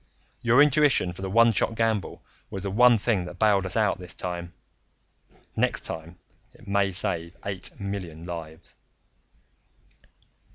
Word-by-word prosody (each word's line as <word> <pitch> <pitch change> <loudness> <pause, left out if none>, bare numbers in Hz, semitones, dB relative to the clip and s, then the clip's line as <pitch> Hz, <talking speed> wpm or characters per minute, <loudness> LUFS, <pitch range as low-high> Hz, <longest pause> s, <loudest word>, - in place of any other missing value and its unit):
Your 120 +4 +5
intuition 145 -10 +3
for 90 - -11
the 95 - -3
one 115 +3 +5
shot 115 - 0
gamble 110 -4 -1 0.3
was 95 -1 -6
the 100 - -3
one 120 +3 +6
thing 105 -4 0
that 90 0 -9
bailed 100 -2 +3
us 95 - -2
out 105 -4 +1
this 90 0 -8
time. 85 -1 -4 1.0
Next - - +1
time 80 +2 -5 0.4
it 115 - -18
may 100 0 +1
save 85 -1 -1
eight 100 -2 -3
million 95 -5 -6
lives." 80 -2 -8
95 Hz, 140 wpm, -26 LUFS, 90-110 Hz, 1.0 s, one